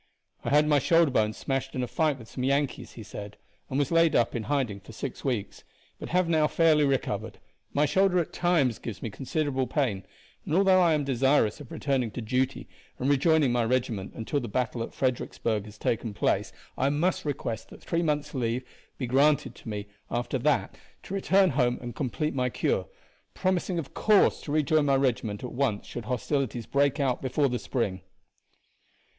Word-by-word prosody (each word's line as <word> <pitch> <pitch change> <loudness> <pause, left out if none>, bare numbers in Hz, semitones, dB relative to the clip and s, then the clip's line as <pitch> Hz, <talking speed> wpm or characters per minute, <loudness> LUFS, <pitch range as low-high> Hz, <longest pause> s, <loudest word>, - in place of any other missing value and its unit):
"I - - -2
had 150 +1 +4
my 150 -1 +4
shoulder 165 +1 +4
bone 110 -4 +2
smashed 135 +4 -3
in 130 - -1
a - - -2
fight 155 0 +1
with 115 -3 -12
some 125 - -5
Yankees," 140 +1 0
he 115 - -9
said, 105 0 -8 0.3
"and 130 - -2
was 140 -2 +1
laid 165 -1 +4
up 115 - +3
in 120 - -1
hiding 130 -9 -1
for 110 - -13
six 130 +3 -6
weeks; 120 -7 -3 0.4
but - - -7
have 180 0 +2
now 155 -2 +3
fairly 155 -2 +4
recovered. 135 -2 -1 0.3
My 145 +1 +2
shoulder, 190 +4 +3
at 170 - -1
times, 160 -10 +2
gives 105 -6 -7
me 115 - -3
considerable 135 +1 -1
pain, 115 -10 -1 0.4
and 155 - -2
although 190 -1 +5
I 170 -3 +4
am 150 - 0
desirous 135 -3 +2
of 135 - -11
returning 135 -5 0
to - - -5
duty 130 +4 -1 0.3
and 135 +3 +1
rejoining 145 -1 +3
my 120 -1 +2
regiment 115 -5 -1
until 115 +6 -2
the 120 - -5
battle 120 +1 -1
at 115 - -4
Fredericksburg 115 -4 -1
has 105 0 -12
taken 110 -1 -2
place, - - 0 0.3
I 135 - +3
must 160 +6 0
request 120 -6 -4
that - - -14
three 165 - 0
months' 150 -2 -1
leave 125 -1 -1 0.3
be 130 - -2
granted 140 +4 +3
to - - -10
me 105 -1 -4 0.2
after 120 +2 -2
that 145 +3 0 0.2
to - - -8
return 195 -1 +3
home 125 -2 +1
and 120 -2 -7
complete 150 +3 -2
my 125 -1 0
cure, - - 0 0.5
promising 185 -1 0
of 160 -5 -5
course 210 -2 +4
to 145 - -6
rejoin 155 0 +2
my 135 - +4
regiment 120 -6 0
at 125 - -5
once 120 -6 0
should 120 - -7
hostilities 125 0 -1
break 140 +4 +1
out 135 -3 0
before 135 +2 +1
the 125 -1 -2
spring." 100 -8 -2
135 Hz, 190 wpm, -27 LUFS, 120-150 Hz, 0.5 s, although